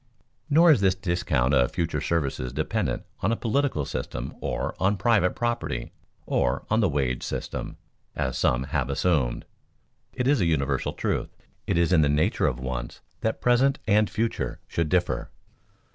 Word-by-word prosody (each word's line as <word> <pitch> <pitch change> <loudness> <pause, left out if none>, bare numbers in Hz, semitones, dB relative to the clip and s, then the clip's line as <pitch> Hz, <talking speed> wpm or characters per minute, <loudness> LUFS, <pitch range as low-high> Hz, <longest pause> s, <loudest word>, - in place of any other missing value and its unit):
Nor 165 +3 +6
is 130 -9 +4
this 95 -1 +3
discount 85 -9 0
of 65 -3 +3
future 85 - -1
services 70 -6 -1
dependent 75 +3 -1 0.2
on 95 - +1
a - - +2
political 120 - 0
system 65 - -4
or - - -2
on 100 +2 +2
private 100 -5 +2
property 120 - -2 0.3
or - - 0
on 110 - +3
the 105 -5 +3
wage 65 -4 -1
system, - - -5 0.4
as - - -1
some 60 +1 +2
have 70 -1 -2
assumed. 70 -4 0 0.7
It 125 - -2
is 140 -5 +3
a - - +3
universal 70 -4 0
truth. - - -2 0.4
It - - +1
is 85 +1 +3
in 80 - +6
the 75 - +3
nature 75 +2 +2
of - - -2
wants 65 -1 -5 0.2
that 110 - -2
present 130 +3 +3
and 105 0 +3
future 115 +1 -2
should 85 -2 -1
differ. 90 -8 0
85 Hz, 160 wpm, -26 LUFS, 70-110 Hz, 0.7 s, Nor